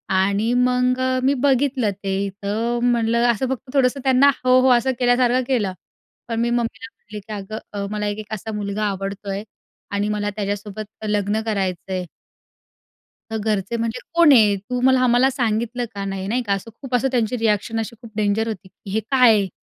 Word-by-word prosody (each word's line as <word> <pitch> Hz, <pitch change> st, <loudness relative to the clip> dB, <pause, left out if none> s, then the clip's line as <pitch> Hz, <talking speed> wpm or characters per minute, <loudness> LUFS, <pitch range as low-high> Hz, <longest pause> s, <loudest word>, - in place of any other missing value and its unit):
आणि 200 Hz, +5 st, +2 dB
मग 250 Hz, 0 st, +2 dB
अ, 260 Hz, 0 st, +1 dB
मी 275 Hz, +2 st, +4 dB
बघितलं 260 Hz, -5 st, +2 dB
ते. 195 Hz, +1 st, -1 dB
तर 230 Hz, +4 st, -1 dB
म्हणलं 235 Hz, 0 st, +2 dB
असं 245 Hz, +3 st, -2 dB
फक्त 265 Hz, 0 st, -4 dB
थोडंसं 270 Hz, 0 st, +2 dB
त्यांना 265 Hz, +1 st, +5 dB, 0.2 s
हो, 255 Hz, 0 st, +6 dB
हो. 260 Hz, -, +4 dB
असं 260 Hz, +2 st, 0 dB
केल्यासारखं 245 Hz, +1 st, +3 dB
केलं. 210 Hz, -8 st, 0 dB, 0.5 s
पण 230 Hz, -1 st, -2 dB
मी 235 Hz, -, +1 dB
मम्मीला 240 Hz, +1 st, -2 dB
म्हटली 210 Hz, -1 st, -10 dB
की 215 Hz, +2 st, -9 dB
"अगं 200 Hz, 0 st, -6 dB
मला 210 Hz, 0 st, -2 dB
एक 205 Hz, +1 st, -2 dB
एक 215 Hz, 0 st, -7 dB
असा 220 Hz, +1 st, -5 dB
मुलगा 205 Hz, 0 st, -3 dB
आवडतोय 195 Hz, 0 st, -4 dB, 0.5 s
आणि 205 Hz, +1 st, 0 dB
मला 205 Hz, -1 st, -1 dB
त्याच्यासोबत 205 Hz, +1 st, -5 dB
लग्न 205 Hz, +1 st, 0 dB
करायचंय." 185 Hz, -2 st, -2 dB, 1.3 s
"तर 220 Hz, -, -2 dB
घरचे 210 Hz, +1 st, -1 dB
म्हणजे 230 Hz, +1 st, -2 dB
कोण 335 Hz, -4 st, +7 dB
आहे? 210 Hz, -5 st, +5 dB
तू 245 Hz, +6 st, -4 dB
मला 260 Hz, 0 st, +4 dB
आम्हाला 250 Hz, +2 st, +4 dB
सांगितलं 240 Hz, -1 st, -1 dB
का 200 Hz, 0 st, -4 dB
नाही?" 195 Hz, -1 st, -4 dB
नाही 245 Hz, +3 st, 0 dB
का, 205 Hz, -3 st, -1 dB
असं 195 Hz, +4 st, -3 dB
खूप 260 Hz, -2 st, -5 dB
असं 265 Hz, +2 st, +2 dB
त्यांची 240 Hz, 0 st, +1 dB
रिएक्शन 225 Hz, 0 st, 0 dB
अशी 225 Hz, +1 st, -6 dB
खूप 230 Hz, -, -11 dB
डेंजर 215 Hz, +2 st, +1 dB
होती, 195 Hz, -3 st, -6 dB
की 195 Hz, -, -13 dB
हे 220 Hz, -, +1 dB
काय 255 Hz, -3 st, +6 dB
आहे? 200 Hz, -2 st, +1 dB
225 Hz, 185 wpm, -21 LUFS, 205-250 Hz, 1.3 s, कोण